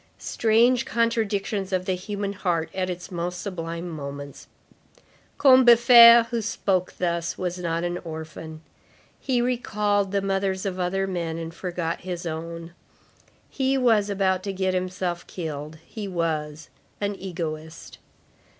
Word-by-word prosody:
Strange 235 Hz, +2 st, +2 dB
contradictions 215 Hz, -4 st, -1 dB
of 185 Hz, -1 st, 0 dB
the 185 Hz, -, 0 dB
human 200 Hz, +2 st, -4 dB
heart 175 Hz, -4 st, -1 dB
at 185 Hz, -1 st, -2 dB
its 180 Hz, +1 st, -6 dB
most 175 Hz, 0 st, -3 dB
sublime 170 Hz, -3 st, -5 dB
moments. 140 Hz, -3 st, -7 dB, 0.9 s
Combeferre, 235 Hz, -3 st, +8 dB
who 235 Hz, -1 st, 0 dB
spoke 195 Hz, -4 st, -1 dB
thus, 170 Hz, -1 st, -1 dB
was 180 Hz, 0 st, -3 dB
not 170 Hz, -1 st, -2 dB
an 175 Hz, 0 st, -2 dB
orphan. 160 Hz, -1 st, -8 dB, 0.6 s
He 250 Hz, -3 st, 0 dB
recalled 210 Hz, -5 st, 0 dB
the 200 Hz, -1 st, 0 dB
mothers 195 Hz, -1 st, -1 dB
of 185 Hz, -1 st, -3 dB
other 190 Hz, +2 st, 0 dB
men, 170 Hz, -4 st, -3 dB
and 165 Hz, 0 st, -6 dB
forgot 170 Hz, -1 st, -4 dB
his 175 Hz, -1 st, -5 dB
own. 165 Hz, +1 st, -6 dB, 0.7 s
He 270 Hz, 0 st, 0 dB
was 225 Hz, -5 st, +3 dB
about 190 Hz, -2 st, +1 dB
to 195 Hz, 0 st, -4 dB
get 190 Hz, 0 st, 0 dB
himself 180 Hz, -1 st, -3 dB
killed. 155 Hz, -2 st, -6 dB
He 210 Hz, -3 st, -7 dB
was 155 Hz, -4 st, -3 dB, 0.3 s
"an 205 Hz, 0 st, -1 dB
egoist." 165 Hz, -4 st, -6 dB
185 Hz, 130 wpm, -25 LUFS, 170-205 Hz, 0.9 s, Combeferre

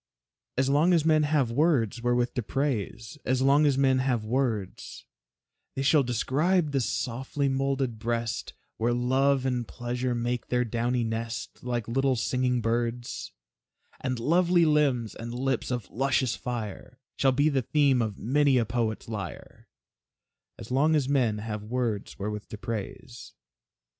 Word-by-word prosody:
As 130 Hz, 0 st, +2 dB
long 150 Hz, +6 st, +4 dB
as 165 Hz, -3 st, +3 dB
men 155 Hz, -1 st, +4 dB
have 145 Hz, -5 st, +1 dB
words 125 Hz, -, +2 dB
wherewith 120 Hz, 0 st, +1 dB
to 125 Hz, -, -1 dB
praise, 120 Hz, +1 st, -3 dB
As 130 Hz, 0 st, +1 dB
long 145 Hz, +2 st, +5 dB
as 140 Hz, -2 st, +2 dB
men 135 Hz, -1 st, +3 dB
have 125 Hz, -4 st, 0 dB
words, 115 Hz, -5 st, -2 dB, 0.7 s
They 135 Hz, -, -1 dB
shall 145 Hz, +1 st, +5 dB
describe 145 Hz, -, +1 dB
the 135 Hz, -1 st, +1 dB
softly 130 Hz, +4 st, -2 dB
moulded 135 Hz, -3 st, -1 dB
breast, 115 Hz, 0 st, -2 dB, 0.2 s
Where 120 Hz, +2 st, +1 dB
Love 130 Hz, +2 st, +2 dB
and 125 Hz, -2 st, -1 dB
Pleasure 125 Hz, 0 st, -3 dB
make 120 Hz, 0 st, -2 dB
their 125 Hz, 0 st, +1 dB
downy 120 Hz, +2 st, 0 dB
nest, 115 Hz, +1 st, -4 dB
Like 120 Hz, -3 st, -2 dB
little 135 Hz, +2 st, +1 dB
singing 125 Hz, +1 st, 0 dB
birds; 120 Hz, +1 st, -2 dB, 0.7 s
And 130 Hz, -1 st, -2 dB
lovely 170 Hz, +5 st, +3 dB
limbs, 140 Hz, -8 st, +2 dB
and 115 Hz, +1 st, -7 dB
lips 130 Hz, -1 st, -1 dB
of 120 Hz, -5 st, -3 dB
luscious 130 Hz, -2 st, +1 dB
fire, 120 Hz, 0 st, -6 dB, 0.2 s
Shall 135 Hz, -, +4 dB
be 145 Hz, +4 st, +2 dB
the 135 Hz, -3 st, +1 dB
theme 140 Hz, -1 st, +3 dB
of 110 Hz, -3 st, -2 dB
many 140 Hz, +2 st, +2 dB
a 120 Hz, -, +2 dB
poet's 110 Hz, -1 st, -2 dB
lyre, 100 Hz, -6 st, -7 dB, 0.9 s
As 110 Hz, -, -10 dB
long 150 Hz, +5 st, +3 dB
as 145 Hz, -4 st, +1 dB
men 125 Hz, -6 st, +2 dB
have 105 Hz, 0 st, -4 dB
words 115 Hz, -2 st, -3 dB
wherewith 105 Hz, +1 st, -4 dB
to 105 Hz, -, -7 dB
praise. 115 Hz, +3 st, -6 dB
125 Hz, 150 wpm, -27 LUFS, 115-135 Hz, 0.9 s, long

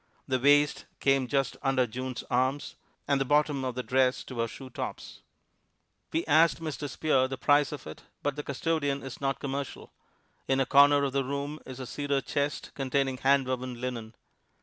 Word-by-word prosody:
The 130 Hz, -1 st, +1 dB
waist 145 Hz, +2 st, +4 dB
came 135 Hz, -2 st, +2 dB
just 135 Hz, 0 st, 0 dB
under 135 Hz, -2 st, +2 dB
June's 125 Hz, +2 st, -5 dB
arms, 130 Hz, +3 st, 0 dB, 0.3 s
and 140 Hz, -1 st, +2 dB
the -, -, +4 dB
bottom 145 Hz, 0 st, +2 dB
of 130 Hz, -2 st, -3 dB
the 125 Hz, -, -3 dB
dress 130 Hz, +2 st, +2 dB
to 125 Hz, -3 st, -8 dB
her 115 Hz, -, +1 dB
shoe 130 Hz, +3 st, -10 dB
tops. -, -, -6 dB, 0.9 s
We 165 Hz, -, 0 dB
asked 160 Hz, +2 st, +4 dB
Mr. 155 Hz, -2 st, -4 dB
Spear 135 Hz, -2 st, +2 dB
the 135 Hz, 0 st, -5 dB
price 145 Hz, +2 st, +3 dB
of 150 Hz, -, -7 dB
it, 75 Hz, -, -9 dB, 0.2 s
but 145 Hz, -1 st, 0 dB
the 150 Hz, -, -3 dB
custodian 145 Hz, 0 st, -1 dB
is 135 Hz, 0 st, -8 dB
not 135 Hz, -1 st, -1 dB
commercial. 140 Hz, -2 st, -5 dB, 0.5 s
In 135 Hz, 0 st, +2 dB
a 135 Hz, -, +3 dB
corner 140 Hz, +2 st, +6 dB
of 135 Hz, -2 st, -1 dB
the 135 Hz, 0 st, +1 dB
room 140 Hz, +3 st, -4 dB
is 130 Hz, 0 st, -8 dB
a 130 Hz, -, -5 dB
cedar 145 Hz, +2 st, -1 dB
chest 145 Hz, +1 st, -2 dB
containing 135 Hz, -1 st, 0 dB
hand 135 Hz, 0 st, +3 dB
woven 130 Hz, -1 st, -3 dB
linen. 120 Hz, -3 st, -5 dB
135 Hz, 185 wpm, -29 LUFS, 130-145 Hz, 0.9 s, corner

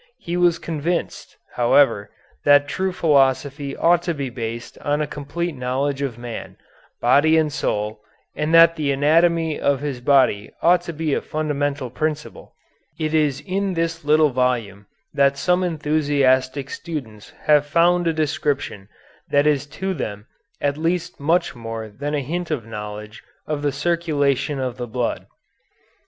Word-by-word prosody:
He 170 Hz, -, -5 dB
was 175 Hz, -1 st, +3 dB
convinced, 165 Hz, +2 st, -3 dB, 0.2 s
however, 120 Hz, -4 st, +3 dB, 0.3 s
that 145 Hz, 0 st, +5 dB
true 190 Hz, +6 st, -1 dB
philosophy 140 Hz, -3 st, +1 dB
ought 170 Hz, 0 st, +4 dB
to 170 Hz, -1 st, -2 dB
be 140 Hz, -3 st, -4 dB
based 115 Hz, -1 st, -6 dB
on 145 Hz, +1 st, -1 dB
a 150 Hz, -, 0 dB
complete 150 Hz, +4 st, -4 dB
knowledge 135 Hz, +2 st, -2 dB
of 130 Hz, -5 st, -3 dB
man, 120 Hz, -1 st, -7 dB, 0.4 s
body 145 Hz, +6 st, +4 dB
and 155 Hz, -2 st, +1 dB
soul, 105 Hz, -4 st, -2 dB, 0.3 s
and 150 Hz, +1 st, -1 dB
that 165 Hz, 0 st, +7 dB
the 150 Hz, -3 st, 0 dB
anatomy 160 Hz, +3 st, +2 dB
of 140 Hz, -1 st, +1 dB
his 140 Hz, -4 st, -4 dB
body 125 Hz, -6 st, +3 dB
ought 175 Hz, +1 st, +5 dB
to -, -, 0 dB
be 155 Hz, -1 st, -1 dB
a -, -, 0 dB
fundamental 145 Hz, -4 st, -2 dB
principle. 155 Hz, +2 st, -4 dB, 0.4 s
It 155 Hz, -1 st, -1 dB
is 150 Hz, -3 st, +1 dB
in 195 Hz, 0 st, -2 dB
this 165 Hz, 0 st, -2 dB
little 150 Hz, 0 st, +4 dB
volume 120 Hz, -6 st, -1 dB, 0.3 s
that 140 Hz, 0 st, +3 dB
some 180 Hz, +4 st, +1 dB
enthusiastic 145 Hz, -4 st, +1 dB
students 120 Hz, -11 st, -7 dB
have 150 Hz, -1 st, +4 dB
found 175 Hz, +3 st, +3 dB
a -, -, +3 dB
description 145 Hz, -9 st, -2 dB, 0.4 s
that 145 Hz, 0 st, +3 dB
is 145 Hz, -2 st, +1 dB
to 190 Hz, +6 st, -3 dB
them 105 Hz, -, -5 dB, 0.3 s
at 145 Hz, +1 st, -1 dB
least 175 Hz, +2 st, -2 dB
much 165 Hz, +5 st, +1 dB
more 115 Hz, -1 st, -6 dB
than 145 Hz, +8 st, -4 dB
a 145 Hz, -, 0 dB
hint 175 Hz, +6 st, -3 dB
of 140 Hz, -9 st, -2 dB
knowledge 105 Hz, -1 st, -8 dB, 0.2 s
of 150 Hz, -1 st, -3 dB
the 145 Hz, -1 st, 0 dB
circulation 145 Hz, -3 st, 0 dB
of 130 Hz, -2 st, -3 dB
the 120 Hz, -1 st, -5 dB
blood. 120 Hz, +1 st, -3 dB
145 Hz, 150 wpm, -21 LUFS, 130-160 Hz, 0.4 s, that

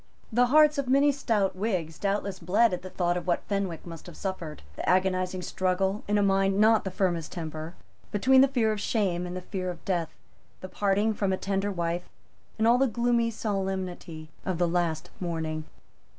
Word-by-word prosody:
The 245 Hz, +2 st, +4 dB
hearts 300 Hz, +2 st, +5 dB
of 275 Hz, -, -1 dB
many 280 Hz, +3 st, +4 dB
stout 220 Hz, -9 st, 0 dB
Whigs 185 Hz, -6 st, -2 dB
doubtless 200 Hz, -1 st, -1 dB
bled 200 Hz, +6 st, +3 dB
at 180 Hz, -, -3 dB
the 185 Hz, -, -8 dB
thought 175 Hz, -1 st, 0 dB
of 180 Hz, -, -6 dB
what 175 Hz, -, +1 dB
Fenwick 195 Hz, -5 st, -3 dB
must 165 Hz, -1 st, -9 dB
have 175 Hz, -, -11 dB
suffered, 175 Hz, -, -5 dB
the -, -, -3 dB
agonizing 185 Hz, 0 st, +1 dB
struggle, 190 Hz, +3 st, 0 dB
in 210 Hz, 0 st, +2 dB
a 205 Hz, -, +3 dB
mind 195 Hz, 0 st, +2 dB
not 220 Hz, +1 st, +6 dB
of -, -, -7 dB
the -, -, -1 dB
firmest 180 Hz, -4 st, -1 dB
temper, 160 Hz, 0 st, -6 dB, 0.4 s
between 260 Hz, +5 st, +5 dB
the 270 Hz, -, +6 dB
fear 240 Hz, -5 st, +1 dB
of 210 Hz, -1 st, -3 dB
shame 185 Hz, -6 st, 0 dB
and 180 Hz, +1 st, -5 dB
the -, -, -5 dB
fear 185 Hz, 0 st, -4 dB
of 175 Hz, -, -8 dB
death, 175 Hz, -4 st, 0 dB, 0.5 s
the 185 Hz, -, -7 dB
parting 205 Hz, +3 st, +1 dB
from 200 Hz, -2 st, 0 dB
a 190 Hz, -, 0 dB
tender 195 Hz, +1 st, -1 dB
wife, 175 Hz, -1 st, -2 dB, 0.5 s
and 220 Hz, +1 st, +2 dB
all 240 Hz, +2 st, +5 dB
the 270 Hz, -, +4 dB
gloomy 235 Hz, 0 st, +1 dB
solemnity 190 Hz, -7 st, -4 dB
of 185 Hz, -3 st, -2 dB
the 175 Hz, 0 st, +2 dB
last 170 Hz, -2 st, -1 dB
morning. 160 Hz, -3 st, -3 dB
190 Hz, 195 wpm, -27 LUFS, 175-215 Hz, 0.5 s, not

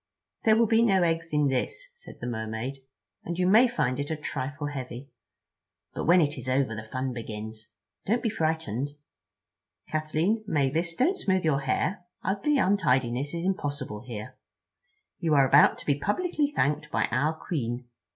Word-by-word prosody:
"There 220 Hz, -1 st, +6 dB
will 230 Hz, -, +5 dB
be 225 Hz, +1 st, +4 dB
no 195 Hz, -6 st, +4 dB
eggs 165 Hz, -1 st, 0 dB
in 150 Hz, -1 st, +3 dB
this," 320 Hz, -, -2 dB
said 480 Hz, 0 st, -12 dB
the -, -, -6 dB
Mermaid, 110 Hz, +3 st, -4 dB, 0.4 s
"and 170 Hz, 0 st, -4 dB
you 180 Hz, -, +2 dB
may 220 Hz, +7 st, +6 dB
find 135 Hz, -, -1 dB
it 145 Hz, -, -3 dB
a 160 Hz, -, -1 dB
trifle 145 Hz, -1 st, -4 dB
heavy. 130 Hz, -2 st, -6 dB, 0.8 s
But -, -, -3 dB
when 175 Hz, +2 st, +6 dB
it 150 Hz, -1 st, 0 dB
is 130 Hz, -, -5 dB
over 130 Hz, -3 st, +1 dB
the 110 Hz, -, -5 dB
fun 130 Hz, 0 st, -2 dB
begins. 110 Hz, -1 st, -7 dB, 0.4 s
Don't 235 Hz, +4 st, +1 dB
be 230 Hz, -, +2 dB
frightened, 150 Hz, -, -1 dB, 0.9 s
Kathleen—Mavis, 160 Hz, -1 st, 0 dB
don't 355 Hz, -, +2 dB
smooth 190 Hz, -2 st, +1 dB
your 145 Hz, -3 st, +3 dB
hair. 140 Hz, +8 st, -1 dB, 0.2 s
Ugly 205 Hz, -, +1 dB
untidiness 140 Hz, -, +1 dB
is 170 Hz, +1 st, -3 dB
impossible 145 Hz, -, -2 dB
here. 110 Hz, -4 st, -7 dB, 0.8 s
You 160 Hz, -3 st, +2 dB
are 135 Hz, -2 st, +5 dB
about 145 Hz, +3 st, +6 dB
to -, -, -11 dB
be 145 Hz, -1 st, +1 dB
publicly 300 Hz, -, 0 dB
thanked 150 Hz, -, 0 dB
by -, -, +1 dB
our 150 Hz, +5 st, +2 dB
Queen. 125 Hz, -7 st, -3 dB
150 Hz, 160 wpm, -27 LUFS, 130-185 Hz, 0.9 s, There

